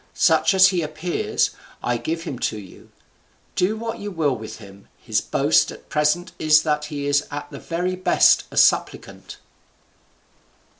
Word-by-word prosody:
Such - - +3
as 185 0 +7
he 180 -2 -1
appears, 155 +3 -2 0.3
I 120 0 0
give 165 +8 -4
him 135 -8 -6
to 110 - -7
you; 95 -3 -13 0.7
do 200 +5 0
what 230 +1 -5
you 205 - -5
will 155 -8 0
with 110 -1 -9
him; 100 -2 -15
his - - -1
boast - - +2
at - - -14
present 150 +3 0
is 155 0 +4
that 150 -1 -1
he 145 -1 -5
is 145 0 +1
at 145 0 -7
the - - -8
very 180 +2 -3
best 185 +1 +3
a - - -10
supplicant." - - +1
155 Hz, 160 wpm, -22 LUFS, 140-180 Hz, 0.7 s, as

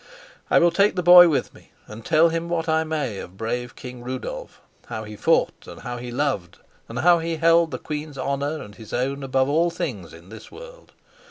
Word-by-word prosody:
I - - +4
will 170 0 +5
take 200 +4 +2
the 180 - -1
boy 175 0 +9
with 150 - -1
me - - -20
and 110 +2 -11
tell 165 +3 +4
him 165 +1 -3
what 165 -1 -2
I 160 0 +2
may 150 -10 -3
of 90 +2 -10
brave 120 +3 -4
King 125 -1 -10
Rudolf, 130 +1 -6 0.3
how 110 - -5
he 105 0 -9
fought - - 0
and - - -11
how 120 0 -5
he 120 0 -7
loved, 120 - -2 0.3
and 115 - -7
how 175 0 +5
he 165 0 -3
held 165 +1 +3
the - - -5
queen's 150 -1 -6
honor 140 +3 -2
and 105 - -12
his 110 0 -12
own 135 +3 -2
above 130 0 0
all 165 +4 +2
things 130 - -5
in 85 +2 -15
this 110 +1 -12
world. - - -13
140 Hz, 210 wpm, -23 LUFS, 120-165 Hz, 0.3 s, boy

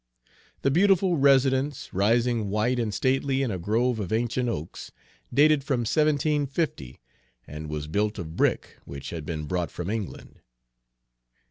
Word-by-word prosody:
The 135 - +3
beautiful 190 +2 +3
residence, 135 0 +2
rising 115 +2 +1
white 110 +5 0
and 115 -3 -1
stately 135 +3 0
in 125 - -1
a 95 - -3
grove 115 +6 0
of 95 -4 -4
ancient 120 +2 0
oaks, 80 -8 -6 0.4
dated 145 +2 +4
from 135 -3 0
1750, 145 - 0 0.5
and 75 +1 -8
was 75 -1 -4
built 105 +7 -1
of 80 -4 -6
brick - - 0
which 70 -1 -8
had 80 -3 -6
been 80 -2 -4
brought 90 +1 -2
from 90 +3 -5
England. 110 -4 -6
120 Hz, 140 wpm, -26 LUFS, 90-135 Hz, 0.5 s, dated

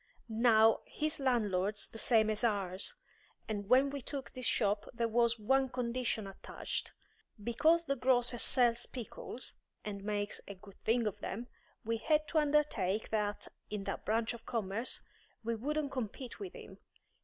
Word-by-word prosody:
Now, 225 -2 +6
his 310 +1 -1
landlord's 210 -6 +1
the 225 - -7
same 220 -1 +4
as 215 +1 -2
ours, 200 - 0 0.5
and 205 -2 -3
when 265 +3 +5
we 280 -1 -4
took 265 -1 -5
this 255 -2 -3
shop 205 -1 +1
there 235 -1 0
was 235 0 +3
one 265 +5 +2
condition 245 -3 -1
attached. 195 0 -4 0.5
Because 320 +9 +3
the 275 - 0
grocer 245 -1 +3
sells 240 -1 +3
pickles, 245 0 -6 0.3
and 200 -2 -5
makes 205 0 -2
a 200 - -7
good 200 +1 -16
thing 230 +1 +3
of 210 - -2
them, 235 +5 -5 0.4
we 230 +1 0
had 305 +5 +2
to 320 - +3
undertake 285 -10 +1
that, 210 -1 0 0.2
in 210 -1 -3
that - - -4
branch 225 +2 +1
of 235 - -10
commerce, 225 +1 -1 0.4
we 230 +1 0
wouldn't 285 +5 -1
compete 250 0 -5
with 390 -3 -6
him. - - -11
230 Hz, 155 wpm, -34 LUFS, 210-260 Hz, 0.5 s, Now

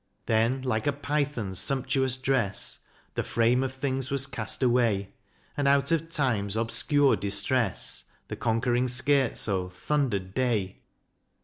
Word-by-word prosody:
Then, 115 +4 +1
like 110 -3 -1
a 145 - +2
python's 140 -9 -2
sumptuous 130 -1 +1
dress 130 -6 -1 0.3
The - - -1
frame 120 +2 +1
of 135 -1 -2
things 130 -1 -2
was 135 -1 0
cast 125 -1 -2
away, 115 -6 +1 0.4
And, 145 -1 0
out 140 +1 +3
of 165 0 0
Time's 115 - 0
obscure 135 +5 +2
distress 100 +2 0 0.2
The - - -5
conquering 120 +2 0
scherzo 125 -8 +1
thundered 100 -2 -2
Day. 115 -7 -1
125 Hz, 125 wpm, -27 LUFS, 110-135 Hz, 0.4 s, out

